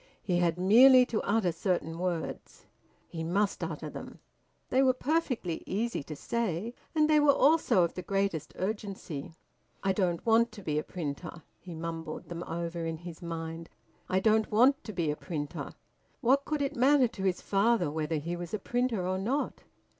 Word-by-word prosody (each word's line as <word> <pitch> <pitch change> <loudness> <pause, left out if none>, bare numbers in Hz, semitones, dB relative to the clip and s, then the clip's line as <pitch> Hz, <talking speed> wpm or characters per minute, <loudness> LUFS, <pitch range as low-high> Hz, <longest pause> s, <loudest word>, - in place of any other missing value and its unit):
He 175 -2 +1
had 170 -1 +1
merely 250 +7 +7
to 230 -3 -2
utter 205 -4 +1
certain 165 -2 -2
words. 175 -3 -4 0.4
He 160 -1 -5
must 195 +5 0
utter - - -4
them. - - -8 0.5
They 260 - +3
were 260 -2 +4
perfectly 255 - -1
easy 230 +1 -1
to 155 +2 -8
say, 225 +2 -2 0.2
and 305 -1 +4
they 305 -1 +5
were 295 -1 +6
also 290 - +4
of 170 - -1
the 180 - -5
greatest 195 -5 -1
urgency. 190 -7 -4 0.5
"I 195 - +2
don't 180 -3 0
want 230 +1 +4
to 205 - -10
be 150 -3 0
a - - -4
printer." 165 0 -6 0.2
He 175 -3 -9
mumbled 165 -1 -6
them 170 -1 -5
over 170 0 -3
in 165 0 -3
his 170 +1 -10
mind. 165 -1 -5 0.4
"I 185 - +2
don't 220 +2 +3
want 260 +7 +4
to 215 - -5
be 170 -6 0
a - - -3
printer." 150 -3 -5 0.5
What 270 +4 +3
could 300 -2 -1
it 275 - -2
matter 265 +1 +5
to 210 - -9
his 185 -2 +1
father 200 -5 +2
whether 155 +1 -2
he 165 +3 -3
was 175 +3 -5
a - - -1
printer 240 -2 -1
or 185 0 -1
not? 255 +9 -2
185 Hz, 180 wpm, -30 LUFS, 165-235 Hz, 0.5 s, merely